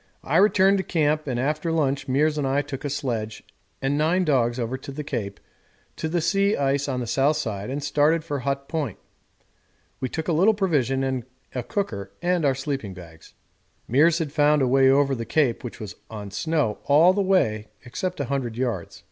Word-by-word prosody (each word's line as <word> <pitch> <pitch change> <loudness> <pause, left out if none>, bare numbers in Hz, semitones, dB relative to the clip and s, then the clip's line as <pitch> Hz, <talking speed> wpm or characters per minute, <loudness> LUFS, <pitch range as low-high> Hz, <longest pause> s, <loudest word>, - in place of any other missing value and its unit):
I 155 - +1
returned 195 0 +4
to - - -1
camp, 155 -3 0
and 125 -2 -1
after 150 +5 -1
lunch 140 -4 0
Meares 150 +4 +2
and 140 - 0
I 140 +2 +1
took 145 0 -7
a 145 - -2
sledge 115 -6 -3 0.4
and 140 +2 +1
nine 175 +4 +2
dogs 120 -5 +2
over 120 +2 -2
the 140 +3 -7
Cape 110 -8 -4 0.6
to 160 - -3
the 170 +1 0
sea 200 +4 +2
ice 140 0 0
on 125 -2 -2
the - - -3
south 140 +6 +2
side 105 -6 -4
and 140 +2 -3
started 150 +3 +2
for 145 -3 -3
Hut 140 +1 -3
Point. 150 - -3 1.0
We 130 - -2
took 160 +4 -4
a 170 - +1
little 195 +8 +4
provision 140 - +1
and 130 -2 -1 0.3
a 125 - -2
cooker 100 - -4
and 175 -2 +1
our 135 -2 +3
sleeping 135 -8 -4
bags. 80 -3 -14 0.5
Meares 155 +7 +4
had 160 -4 -3
found 150 -1 +3
a - - +2
way 135 +1 +5
over 140 0 +3
the 115 -3 -3
Cape 125 0 +1
which 120 - -7
was 105 -2 -7 0.2
on 105 -3 -7
snow 150 -2 -1
all 160 +6 +6
the 200 - 0
way 110 - +1 0.2
except 180 +9 -4
about 140 -2 -3
100 120 -5 -2
yards. 120 -9 -3
140 Hz, 200 wpm, -24 LUFS, 125-155 Hz, 1.0 s, all